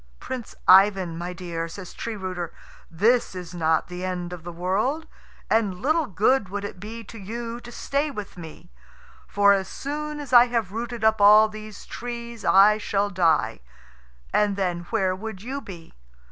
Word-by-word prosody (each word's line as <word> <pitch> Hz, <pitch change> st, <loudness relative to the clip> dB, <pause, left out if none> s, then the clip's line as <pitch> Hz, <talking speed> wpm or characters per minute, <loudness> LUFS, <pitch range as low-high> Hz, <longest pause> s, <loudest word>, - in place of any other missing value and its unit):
"Prince 250 Hz, -4 st, -6 dB
Ivan, 190 Hz, -2 st, +6 dB
my 175 Hz, +2 st, -4 dB
dear," 170 Hz, -2 st, -5 dB
says 180 Hz, +2 st, -9 dB
Tree 230 Hz, -1 st, -5 dB
rooter, 185 Hz, -4 st, -4 dB, 0.4 s
"this 215 Hz, +6 st, +2 dB
is 180 Hz, -1 st, -7 dB
not 160 Hz, -2 st, +1 dB
the 180 Hz, 0 st, -7 dB
end 180 Hz, -1 st, -3 dB
of 175 Hz, -3 st, -9 dB
the 175 Hz, -, -6 dB
world, 200 Hz, -, -1 dB, 0.4 s
and 205 Hz, -5 st, +1 dB
little 310 Hz, +4 st, +1 dB
good 205 Hz, +3 st, +2 dB
would 205 Hz, +1 st, -4 dB
it 195 Hz, -, -7 dB
be 225 Hz, +4 st, -7 dB
to 225 Hz, +2 st, -11 dB
you 230 Hz, +4 st, -5 dB
to 240 Hz, 0 st, -11 dB
stay 280 Hz, +5 st, -1 dB
with 210 Hz, -8 st, -7 dB
me. 165 Hz, -, -11 dB, 0.6 s
For 200 Hz, 0 st, +5 dB
as 190 Hz, -2 st, 0 dB
soon 300 Hz, +4 st, -5 dB
as 280 Hz, -4 st, -7 dB
I 240 Hz, 0 st, +9 dB
have 230 Hz, -6 st, -1 dB
rooted 235 Hz, +1 st, -5 dB
up 220 Hz, -1 st, +3 dB
all 210 Hz, +2 st, +8 dB
these 215 Hz, -1 st, -10 dB
trees 235 Hz, -1 st, -7 dB
I 210 Hz, +2 st, +6 dB
shall 205 Hz, -1 st, -1 dB
die, 160 Hz, -, +2 dB, 0.7 s
and 205 Hz, -1 st, +2 dB
then 175 Hz, -3 st, -2 dB
where 190 Hz, -5 st, +1 dB
would 205 Hz, 0 st, -7 dB
you 270 Hz, +4 st, -4 dB
be? 170 Hz, -7 st, -11 dB
205 Hz, 175 wpm, -24 LUFS, 180-235 Hz, 0.7 s, I